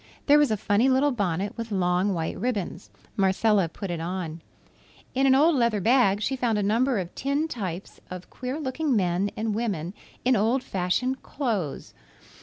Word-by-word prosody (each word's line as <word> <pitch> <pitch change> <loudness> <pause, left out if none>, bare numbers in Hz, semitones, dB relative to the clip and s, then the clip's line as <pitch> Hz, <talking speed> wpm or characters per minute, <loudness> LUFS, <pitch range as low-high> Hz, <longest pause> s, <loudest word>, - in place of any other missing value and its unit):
There 295 0 +6
was 295 - +3
a 215 - 0
funny 205 +6 +2
little 270 +2 +3
bonnet 200 -4 -2
with 230 -1 -6
long 180 0 +1
white 160 -1 -2
ribbons. 205 -7 -3 0.3
Marcella 195 -1 +2
put 190 +3 -6
it 170 - -3
on. 170 -2 -4 0.7
In 270 +1 +2
an 265 - +6
old 315 +5 +5
leather 235 -4 +2
bag 215 -2 +3
she 265 - 0
found 240 -4 0
a 205 - 0
number 235 +5 +2
of 180 -3 -4
tin 280 +4 -1
types 195 - -6
of 180 0 -9
queer 255 +4 -5
looking 290 0 -1
men 185 0 +1
and 220 0 -1
women 200 -6 -2 0.3
in 255 0 +4
old 235 +5 +1
fashioned 195 +8 -1
clothes. 215 - -3
215 Hz, 175 wpm, -26 LUFS, 185-255 Hz, 0.7 s, There